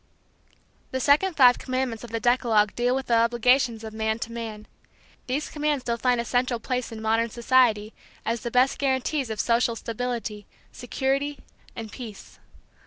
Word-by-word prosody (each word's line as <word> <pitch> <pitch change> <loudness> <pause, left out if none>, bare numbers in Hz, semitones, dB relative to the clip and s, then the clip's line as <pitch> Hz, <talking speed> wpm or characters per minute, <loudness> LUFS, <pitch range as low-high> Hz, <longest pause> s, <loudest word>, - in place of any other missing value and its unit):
The 260 - -2
second 300 +7 +3
five 250 -3 +7
commandments 255 -3 -2
of 240 - -8
the 230 +1 -2
decalogue 225 -3 +2
deal 245 +1 +1
with 265 0 -2
the 235 - +3
obligations 240 0 +2
of 220 -1 -7
man 220 0 -1
to 230 - -4
man. 220 -2 -6 0.6
These 275 +4 -2
commands 295 -3 -1
still 235 -1 -1
find 250 -1 +2
a 235 - -2
central 245 0 0
place 250 +1 -3
in 220 -1 -7
modern 225 +1 +1
society 235 -3 +2 0.3
as 230 0 -1
the 235 - -3
best 250 +2 +2
guarantees 270 0 0
of 220 -1 -4
social 235 0 +2
stability, 230 -2 -4 0.2
security 270 +3 -2 0.4
and 225 -2 -7
peace. 225 -5 -10
240 Hz, 165 wpm, -25 LUFS, 225-260 Hz, 0.6 s, five